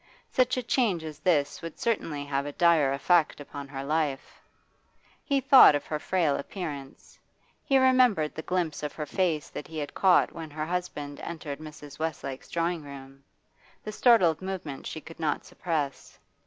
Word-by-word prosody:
Such 255 Hz, 0 st, +2 dB
a 255 Hz, -, -1 dB
change 225 Hz, -8 st, +1 dB
as 155 Hz, -2 st, -8 dB
this 155 Hz, -4 st, +1 dB
would 165 Hz, -2 st, -7 dB
certainly 160 Hz, -11 st, -1 dB
have 140 Hz, 0 st, -2 dB
a -, -, -4 dB
dire 160 Hz, -4 st, +3 dB
effect 155 Hz, +4 st, +2 dB
upon 145 Hz, -1 st, -8 dB
her 135 Hz, 0 st, -6 dB
life. 150 Hz, -2 st, -2 dB, 0.8 s
He 280 Hz, -2 st, +1 dB
thought 270 Hz, -, +8 dB
of 145 Hz, -, -3 dB
her 150 Hz, -, -3 dB
frail 160 Hz, -3 st, +1 dB
appearance; 140 Hz, -5 st, -7 dB, 0.4 s
he 270 Hz, -, +3 dB
remembered 255 Hz, -11 st, +4 dB
the 160 Hz, -, -5 dB
glimpse 175 Hz, -3 st, -2 dB
of 150 Hz, -1 st, -4 dB
her 155 Hz, -, -5 dB
face 165 Hz, -4 st, -1 dB
that -, -, -7 dB
he 160 Hz, -, -8 dB
had 145 Hz, -2 st, -4 dB
caught 185 Hz, -2 st, +4 dB
when 165 Hz, -2 st, -7 dB
her 155 Hz, +1 st, -4 dB
husband 155 Hz, -5 st, -4 dB
entered 155 Hz, -4 st, -6 dB
Mrs. 150 Hz, -2 st, -11 dB
Westlake's 140 Hz, -4 st, -4 dB
drawing 170 Hz, 0 st, -1 dB
room, 135 Hz, -1 st, -11 dB, 0.6 s
the 215 Hz, -, -5 dB
startled 210 Hz, -9 st, +4 dB
movement 185 Hz, -8 st, -5 dB
she 155 Hz, -, -6 dB
could 165 Hz, -, -13 dB
not 155 Hz, -3 st, -1 dB
suppress. 150 Hz, -6 st, -4 dB
155 Hz, 170 wpm, -27 LUFS, 145-180 Hz, 0.8 s, thought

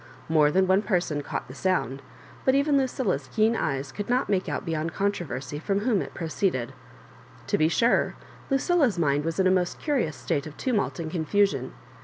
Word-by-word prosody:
More 155 Hz, -2 st, +4 dB
than 190 Hz, +5 st, +3 dB
one 190 Hz, +2 st, +3 dB
person 180 Hz, -8 st, 0 dB
caught -, -, -5 dB
the 130 Hz, -, -10 dB
sound, 140 Hz, -6 st, -1 dB, 0.4 s
but 260 Hz, -, +3 dB
even 280 Hz, +1 st, +3 dB
Lucilla's 245 Hz, -, 0 dB
keen 220 Hz, +1 st, +3 dB
eyes 140 Hz, -7 st, -2 dB
could 205 Hz, -, -6 dB
not 250 Hz, +2 st, +1 dB
make 190 Hz, -2 st, 0 dB
out -, -, -3 dB
beyond 160 Hz, -1 st, -2 dB
controversy 150 Hz, -9 st, -2 dB
from 195 Hz, +5 st, -1 dB
whom 215 Hz, -3 st, +2 dB
it -, -, -7 dB
pro 170 Hz, -, -4 dB
ceeded.'^ 155 Hz, -7 st, -1 dB, 0.7 s
To -, -, +1 dB
be 155 Hz, -, +4 dB
sure, 235 Hz, +7 st, +2 dB, 0.3 s
Lucilla's 275 Hz, -, +2 dB
mind 145 Hz, -3 st, +2 dB
was 165 Hz, +3 st, -3 dB
in 190 Hz, -, +3 dB
a 185 Hz, -, +5 dB
most 180 Hz, -1 st, 0 dB
curious 255 Hz, -, 0 dB
state 140 Hz, +4 st, -2 dB
of 155 Hz, -, -11 dB
tumult 230 Hz, -7 st, 0 dB
and 160 Hz, -2 st, -4 dB
confusion. 160 Hz, -, 0 dB
185 Hz, 190 wpm, -26 LUFS, 150-215 Hz, 0.7 s, a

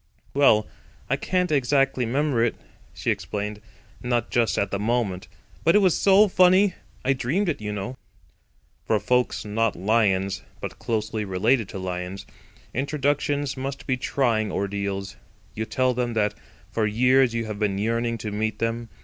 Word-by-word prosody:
"Well, 110 Hz, -7 st, +5 dB, 0.5 s
I -, -, +4 dB
can't 180 Hz, -2 st, 0 dB
exactly 135 Hz, -3 st, +2 dB
'member 135 Hz, -1 st, +1 dB
it," 120 Hz, -, +1 dB, 0.4 s
she -, -, -1 dB
explained, 105 Hz, 0 st, -4 dB, 0.4 s
"not 120 Hz, -1 st, -1 dB
just 115 Hz, -3 st, +2 dB
at 100 Hz, -, 0 dB
the 100 Hz, -, -1 dB
moment. 105 Hz, -4 st, -1 dB, 0.4 s
But 165 Hz, -, +4 dB
it -, -, +8 dB
was 190 Hz, -5 st, +4 dB
so 200 Hz, +2 st, +5 dB
funny. 185 Hz, +1 st, +5 dB, 0.3 s
I 135 Hz, -, +4 dB
dreamed 145 Hz, +10 st, 0 dB
it, 150 Hz, -, -2 dB
you 105 Hz, 0 st, -3 dB
know." 105 Hz, +5 st, -4 dB, 0.9 s
For 110 Hz, -, +2 dB
folks 125 Hz, +3 st, 0 dB
not 110 Hz, +1 st, 0 dB
Lions, 95 Hz, -1 st, +1 dB, 0.2 s
but -, -, -7 dB
closely 110 Hz, -1 st, -2 dB
related 105 Hz, +4 st, +1 dB
to -, -, -6 dB
Lions, 90 Hz, +1 st, -5 dB, 0.5 s
introductions 145 Hz, +1 st, 0 dB
must 135 Hz, +1 st, -5 dB
be 130 Hz, -, +1 dB
trying 115 Hz, -5 st, 0 dB
ordeals. 100 Hz, 0 st, -3 dB, 0.4 s
You 110 Hz, -, -3 dB
tell 130 Hz, +2 st, +1 dB
them 120 Hz, -1 st, -2 dB
that 105 Hz, -1 st, +1 dB, 0.4 s
for 110 Hz, -2 st, +1 dB
years 125 Hz, +3 st, +3 dB
you 115 Hz, -1 st, -1 dB
have 105 Hz, -1 st, -5 dB
been 100 Hz, -2 st, 0 dB
yearning 115 Hz, +2 st, 0 dB
to 105 Hz, -, -2 dB
meet 110 Hz, +1 st, -2 dB
them. 115 Hz, 0 st, -2 dB
115 Hz, 160 wpm, -24 LUFS, 105-135 Hz, 0.9 s, it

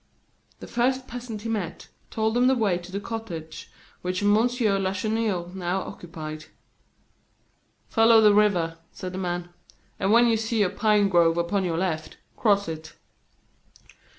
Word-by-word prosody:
The -, -, -7 dB
first 255 Hz, +2 st, 0 dB
peasant 235 Hz, -3 st, -7 dB
he 230 Hz, -, -4 dB
met 210 Hz, -6 st, -4 dB, 0.2 s
told 220 Hz, 0 st, -1 dB
him 245 Hz, +1 st, +4 dB
the 265 Hz, -, +4 dB
way 205 Hz, -7 st, +1 dB
to 175 Hz, +1 st, -12 dB
the 200 Hz, -, -3 dB
cottage 180 Hz, -9 st, -7 dB, 0.3 s
which 185 Hz, +2 st, -2 dB
M. 205 Hz, 0 st, +4 dB
Lacheneur 210 Hz, -4 st, 0 dB
now 185 Hz, 0 st, -2 dB
occupied. 155 Hz, -4 st, -8 dB, 1.4 s
"Follow 225 Hz, 0 st, +5 dB
the 210 Hz, -1 st, +6 dB
river," 180 Hz, -6 st, +2 dB
said 185 Hz, 0 st, -7 dB
the 190 Hz, -, -4 dB
man, 175 Hz, -1 st, -3 dB, 0.5 s
"and 195 Hz, +1 st, +1 dB
when 235 Hz, +2 st, +6 dB
you 230 Hz, -1 st, +3 dB
see 220 Hz, -1 st, 0 dB
a 180 Hz, -, 0 dB
pine 210 Hz, -1 st, +3 dB
grove 170 Hz, -3 st, +3 dB
upon 190 Hz, +3 st, 0 dB
your 165 Hz, -2 st, -1 dB
left, 165 Hz, -3 st, -3 dB, 0.2 s
cross 200 Hz, -4 st, +2 dB
it." 160 Hz, 0 st, -7 dB
200 Hz, 150 wpm, -25 LUFS, 175-225 Hz, 1.4 s, the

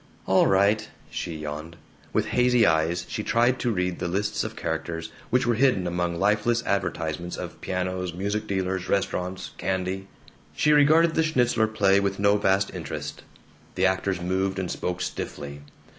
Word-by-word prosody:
"All -, -, +4 dB
right," 100 Hz, +3 st, +3 dB, 0.2 s
she 85 Hz, -, -4 dB
yawned. 75 Hz, +2 st, -6 dB, 0.4 s
With -, -, +1 dB
hazy 125 Hz, -1 st, +4 dB
eyes 80 Hz, +2 st, +2 dB
she -, -, -3 dB
tried 120 Hz, +4 st, +2 dB
to 120 Hz, -, 0 dB
read 90 Hz, -3 st, -1 dB
the -, -, -2 dB
lists 100 Hz, +4 st, -1 dB
of -, -, -5 dB
characters, 80 Hz, 0 st, -4 dB, 0.2 s
which 125 Hz, -, +2 dB
were 120 Hz, -, +3 dB
hidden 120 Hz, -6 st, +3 dB
among 85 Hz, 0 st, -1 dB
lifeless 105 Hz, +4 st, +2 dB
advertisements 85 Hz, -3 st, -2 dB
of -, -, -7 dB
pianos, 90 Hz, -1 st, -2 dB
music 100 Hz, +5 st, -2 dB
dealers, 95 Hz, -1 st, -2 dB
restaurants, 90 Hz, -1 st, -1 dB
candy. 95 Hz, 0 st, -2 dB, 0.5 s
She 150 Hz, -, +3 dB
regarded 155 Hz, +3 st, +5 dB
the 160 Hz, -, +2 dB
Schnitzler 125 Hz, -8 st, +2 dB
play 100 Hz, -3 st, +3 dB
with 100 Hz, -1 st, -1 dB
no 100 Hz, +1 st, +4 dB
vast 95 Hz, -1 st, +1 dB
interest. 75 Hz, -4 st, -6 dB, 0.5 s
The 95 Hz, -, +2 dB
actors 95 Hz, 0 st, +1 dB
moved 95 Hz, +2 st, -1 dB
and 95 Hz, -2 st, -2 dB
spoke 90 Hz, 0 st, -3 dB
stiffly. 70 Hz, -4 st, -5 dB
95 Hz, 160 wpm, -26 LUFS, 85-105 Hz, 0.5 s, regarded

